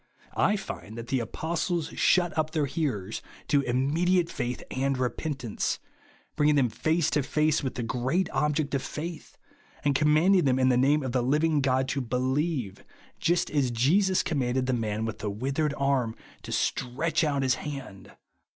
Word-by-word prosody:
I 210 Hz, -, +3 dB
find 115 Hz, -, -7 dB
that 115 Hz, 0 st, -7 dB
the 135 Hz, -, +1 dB
apostles 165 Hz, -, -2 dB
shut 175 Hz, -2 st, +2 dB
up 155 Hz, -1 st, +1 dB
their 155 Hz, -3 st, +1 dB
hearers 125 Hz, -, -2 dB, 0.3 s
to 145 Hz, -1 st, +4 dB
imraedi 140 Hz, +9 st, +1 dB
ate 170 Hz, -1 st, +1 dB
faith 125 Hz, -1 st, -3 dB
and 135 Hz, +1 st, 0 dB
re 125 Hz, -1 st, +1 dB
jyentance, 135 Hz, -9 st, -3 dB, 0.6 s
bringing 150 Hz, 0 st, +3 dB
them 130 Hz, -4 st, +3 dB
face 160 Hz, +8 st, 0 dB
to 150 Hz, -, +2 dB
face 155 Hz, +3 st, +1 dB
with 135 Hz, -3 st, -3 dB
the 120 Hz, -, -3 dB
great 130 Hz, +10 st, 0 dB
object 150 Hz, -1 st, 0 dB
of 140 Hz, -, +1 dB
faith, 160 Hz, +3 st, -7 dB, 0.5 s
and 145 Hz, -, +3 dB
commanding 155 Hz, +6 st, +4 dB
them 130 Hz, -2 st, +3 dB
in 130 Hz, 0 st, +3 dB
the 125 Hz, -, +4 dB
name 140 Hz, +4 st, +3 dB
of 130 Hz, -, -2 dB
the 125 Hz, 0 st, +1 dB
living 150 Hz, +4 st, +2 dB
God 130 Hz, 0 st, +1 dB
to 140 Hz, -, -1 dB
be 125 Hz, 0 st, -2 dB
lieve, 130 Hz, -, -1 dB, 0.4 s
just 175 Hz, +2 st, +1 dB
as 140 Hz, -4 st, +2 dB
Jesus 180 Hz, -, +3 dB
commanded 130 Hz, -5 st, 0 dB
the 130 Hz, -, 0 dB
man 110 Hz, -2 st, -1 dB
with 110 Hz, -, -5 dB
the 105 Hz, -, -2 dB
ivithered 135 Hz, +7 st, -1 dB
arm 135 Hz, -5 st, +1 dB, 0.3 s
to -, -, -8 dB
stretch 140 Hz, +6 st, 0 dB
out 140 Hz, -3 st, +1 dB
his 130 Hz, -1 st, +3 dB
hand. 135 Hz, -10 st, -7 dB
140 Hz, 180 wpm, -27 LUFS, 125-155 Hz, 0.6 s, to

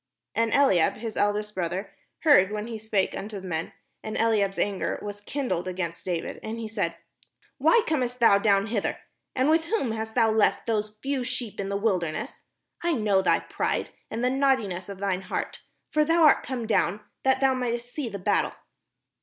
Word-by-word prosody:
And 230 Hz, 0 st, +1 dB
Eliab 195 Hz, -, +4 dB
his 225 Hz, -1 st, -6 dB
eldest 210 Hz, +1 st, 0 dB
brother 185 Hz, +1 st, -3 dB, 0.3 s
heard 210 Hz, -, +6 dB
when 210 Hz, 0 st, -3 dB
he 225 Hz, -1 st, -6 dB
spake 210 Hz, -3 st, 0 dB
unto 205 Hz, 0 st, -5 dB
the 190 Hz, -, -10 dB
men; 165 Hz, -2 st, -3 dB, 0.3 s
and 215 Hz, -, -4 dB
Eliab's 210 Hz, -4 st, +2 dB
anger 200 Hz, -2 st, -1 dB
was 205 Hz, 0 st, -6 dB
kindled 225 Hz, -7 st, -2 dB
against 175 Hz, -2 st, -4 dB
David, 175 Hz, -3 st, -3 dB
and 220 Hz, +1 st, -5 dB
he 230 Hz, -1 st, -4 dB
said: 200 Hz, -6 st, -2 dB, 0.6 s
"Why 470 Hz, -2 st, +5 dB
camest 250 Hz, -5 st, -1 dB
thou 205 Hz, -4 st, +6 dB
down 200 Hz, -1 st, +3 dB
hither? 220 Hz, -2 st, -1 dB, 0.4 s
and 260 Hz, +1 st, +2 dB
with 320 Hz, +1 st, +3 dB
whom 330 Hz, -, 0 dB
hast 220 Hz, 0 st, -4 dB
thou 225 Hz, -3 st, +4 dB
left 220 Hz, -1 st, +2 dB
those 215 Hz, -2 st, -1 dB
few 270 Hz, -1 st, -1 dB
sheep 245 Hz, -3 st, -4 dB
in 195 Hz, 0 st, -2 dB
the 200 Hz, -, 0 dB
wilderness? 185 Hz, -7 st, -2 dB, 0.4 s
I 345 Hz, 0 st, +1 dB
know 210 Hz, -7 st, +2 dB
thy -, -, +3 dB
pride, -, -, -2 dB, 0.2 s
and 230 Hz, +2 st, -3 dB
the 250 Hz, -, +3 dB
naughtiness 240 Hz, -10 st, +1 dB
of 200 Hz, -, -6 dB
thine 190 Hz, -1 st, -1 dB
heart; -, -, -4 dB, 0.3 s
for 305 Hz, -1 st, +3 dB
thou 330 Hz, +2 st, +3 dB
art 300 Hz, -, +6 dB
come 250 Hz, -3 st, -4 dB
down 210 Hz, -2 st, +1 dB, 0.2 s
that 265 Hz, 0 st, +3 dB
thou 270 Hz, -1 st, +4 dB
mightest 245 Hz, -1 st, -3 dB
see 285 Hz, -6 st, -3 dB
the 200 Hz, -, -5 dB
battle." 200 Hz, +2 st, +1 dB
220 Hz, 185 wpm, -26 LUFS, 200-250 Hz, 0.6 s, heard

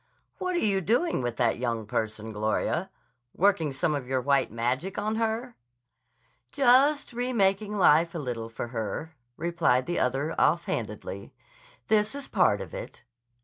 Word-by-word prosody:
"What 365 Hz, -1 st, -1 dB
are 345 Hz, -, +1 dB
you 195 Hz, -2 st, +2 dB
doing 240 Hz, -, +1 dB
with 120 Hz, -2 st, -3 dB
that 120 Hz, -2 st, +1 dB
young 115 Hz, -3 st, -2 dB
person, 110 Hz, +1 st, -3 dB
Gloria? 110 Hz, 0 st, -1 dB, 0.5 s
Working 170 Hz, -6 st, +2 dB
some 135 Hz, +4 st, 0 dB
of 140 Hz, -4 st, -3 dB
your 130 Hz, 0 st, 0 dB
white 140 Hz, -1 st, +1 dB
magic 125 Hz, -, -2 dB
on 215 Hz, +2 st, -1 dB
her?" 230 Hz, +2 st, -2 dB, 1.0 s
"Just 275 Hz, +1 st, +4 dB
remaking 210 Hz, -4 st, 0 dB
life 170 Hz, -2 st, +4 dB
a -, -, -1 dB
little 120 Hz, -6 st, -4 dB
for 115 Hz, +1 st, -6 dB
her," 120 Hz, +7 st, -4 dB, 0.2 s
replied 165 Hz, -7 st, +1 dB
the 175 Hz, -, -1 dB
other 135 Hz, +5 st, 0 dB
offhandedly. -, -, -1 dB, 0.5 s
"This 215 Hz, +3 st, +2 dB
is 280 Hz, -1 st, -5 dB
part -, -, +2 dB
of -, -, -8 dB
it." -, -, -8 dB
165 Hz, 145 wpm, -27 LUFS, -, 1.0 s, Just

